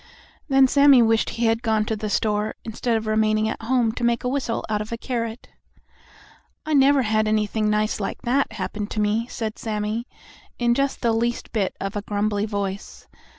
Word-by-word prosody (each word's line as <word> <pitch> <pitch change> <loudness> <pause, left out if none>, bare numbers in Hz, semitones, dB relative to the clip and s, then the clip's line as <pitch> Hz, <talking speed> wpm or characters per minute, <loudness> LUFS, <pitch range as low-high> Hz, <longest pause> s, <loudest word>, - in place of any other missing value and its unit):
Then 270 -1 +5
Sammie 280 -2 +6
wished 225 0 +2
he 235 - -2
had 225 0 +2
gone 220 -2 +1
to 220 - -1
the 215 0 -4
store, 210 0 0
instead 230 +1 -1
of 220 - -4
remaining 215 0 +2
at 220 - -4
home 235 -1 +1
to 240 - -6
make 235 -1 +1
a - - -1
whistle 255 -3 -2
out 210 -1 -1
of 215 - -7
a 230 - -3
carrot. 230 -1 -4 1.2
"I 310 - -1
never 275 -1 +5
had 215 -1 +1
anything 215 0 0
nice 215 0 0
like 195 - -4
that 255 -1 +1
happen 210 0 -4
to 215 - -4
me," 215 +3 +1
said 220 -3 -5
Sammie, 215 +2 -3 0.5
in 240 -1 +2
just 275 +2 -1
the 235 -2 +2
least 235 +1 -1
bit 205 -4 -1
of 195 +1 -4
a 205 - -2
grumbly 205 0 -1
voice. 200 -1 -5
220 Hz, 195 wpm, -23 LUFS, 215-240 Hz, 1.2 s, Sammie